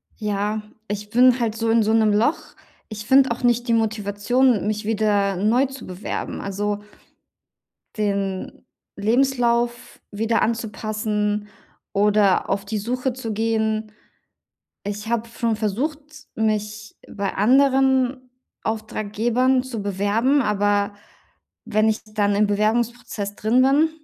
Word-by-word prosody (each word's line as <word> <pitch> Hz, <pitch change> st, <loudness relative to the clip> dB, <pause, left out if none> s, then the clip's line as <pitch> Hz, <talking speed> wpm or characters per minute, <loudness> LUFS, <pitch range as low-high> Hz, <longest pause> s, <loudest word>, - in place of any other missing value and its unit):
Ja, 210 Hz, 0 st, -2 dB, 0.3 s
ich 210 Hz, 0 st, -5 dB
bin 250 Hz, +2 st, +5 dB
halt 225 Hz, -2 st, -1 dB
so 225 Hz, 0 st, -1 dB
in 225 Hz, 0 st, +4 dB
so 220 Hz, +1 st, +1 dB
'nem 220 Hz, -1 st, +4 dB
Loch. 230 Hz, +9 st, +2 dB, 0.5 s
Ich 215 Hz, -1 st, -7 dB
finde 265 Hz, +1 st, +5 dB
auch 235 Hz, -, -4 dB
nicht 240 Hz, 0 st, +2 dB
die 230 Hz, -, +2 dB
Motivation, 220 Hz, +1 st, +1 dB
mich 210 Hz, 0 st, -2 dB
wieder 205 Hz, -2 st, +1 dB
neu 220 Hz, +8 st, +2 dB
zu 270 Hz, +1 st, -8 dB
bewerben, 185 Hz, +2 st, -5 dB
also 205 Hz, +1 st, -2 dB, 1.2 s
den 200 Hz, -3 st, -3 dB, 0.3 s
Lebenslauf 240 Hz, +1 st, 0 dB
wieder 225 Hz, +2 st, 0 dB
anzupassen 215 Hz, -2 st, -2 dB, 0.5 s
oder 205 Hz, -1 st, +3 dB
auf 195 Hz, 0 st, -1 dB
die 215 Hz, +1 st, -3 dB
Suche 250 Hz, +4 st, -2 dB
zu 235 Hz, -3 st, -5 dB
gehen. 220 Hz, 0 st, 0 dB, 1.0 s
Ich 205 Hz, +1 st, -5 dB
habe 235 Hz, -1 st, -1 dB
schon 230 Hz, -1 st, -1 dB
versucht, 235 Hz, +9 st, -2 dB, 0.4 s
mich 215 Hz, -1 st, -2 dB
bei 200 Hz, -1 st, -3 dB
anderen 265 Hz, +2 st, +3 dB, 0.3 s
Auftraggebern 225 Hz, +4 st, 0 dB
zu 240 Hz, -5 st, -5 dB
bewerben, 205 Hz, +8 st, +1 dB
aber 205 Hz, -2 st, +1 dB, 0.7 s
wenn 215 Hz, +1 st, +2 dB
ich 220 Hz, 0 st, 0 dB
dann 210 Hz, -1 st, 0 dB
im 210 Hz, +1 st, +3 dB
Bewerbungsprozess 215 Hz, 0 st, -1 dB
drin 235 Hz, +4 st, +2 dB
bin 290 Hz, +4 st, +4 dB
220 Hz, 120 wpm, -22 LUFS, 205-240 Hz, 1.2 s, bin